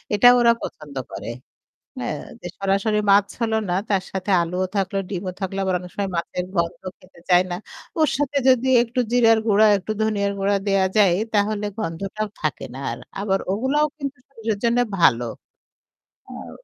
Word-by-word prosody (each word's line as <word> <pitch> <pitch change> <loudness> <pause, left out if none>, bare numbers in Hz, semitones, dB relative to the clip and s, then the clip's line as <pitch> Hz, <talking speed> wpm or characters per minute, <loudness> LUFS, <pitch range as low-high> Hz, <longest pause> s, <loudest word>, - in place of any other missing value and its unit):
এটা 210 +4 +6
ওরা 235 -1 +6
পছন্দ 150 -2 -8 0.2
করে। - - -6 0.7
হ্যাঁ, - - -3 0.2
যে - - -6
সরাসরি 195 +2 +1
মাছ 200 0 +5
হলো 225 -1 +1
না 175 - +1
তার 195 -2 +1
সাথে 190 +1 -3
আলুও 180 +2 -2
থাকলো, 195 0 0
ডিমও 185 -1 -3
থাকল 190 0 -3
আবার 190 -1 0
অনেক 180 0 -10
সময় 200 -1 -2
মাছের 180 +1 -3
গন্ধ 170 0 -1 0.2
খেতে 185 -1 -19
চায় 180 0 +6
না। - - -1 0.4
ওর 310 - +4
সাথে 290 0 -1
যদি 255 0 +3 0.2
একটু 245 +1 -3
জিরার 225 -2 +5
গুঁড়া, 215 +1 +5
একটু 195 +3 -5
ধনিয়ার 200 -2 0
গুঁড়া 200 +1 +2
দেওয়া 195 -1 +3
যায় 195 -5 +5 0.2
তাহলে 210 0 +1
গন্ধটাও 200 +3 -3
থাকে 155 -3 -2
না - - -7
আর। - - -6 0.2
আবার 195 -1 +1
ওগুলাও 265 +8 +1
কিন্তু 280 -1 -5
শরীরের 225 -6 -3
জন্য 235 +1 +3 0.2
ভালো। 120 -8 +4 1.0
হ্যাঁ, - - -9
200 Hz, 170 wpm, -22 LUFS, 185-225 Hz, 1.0 s, এটা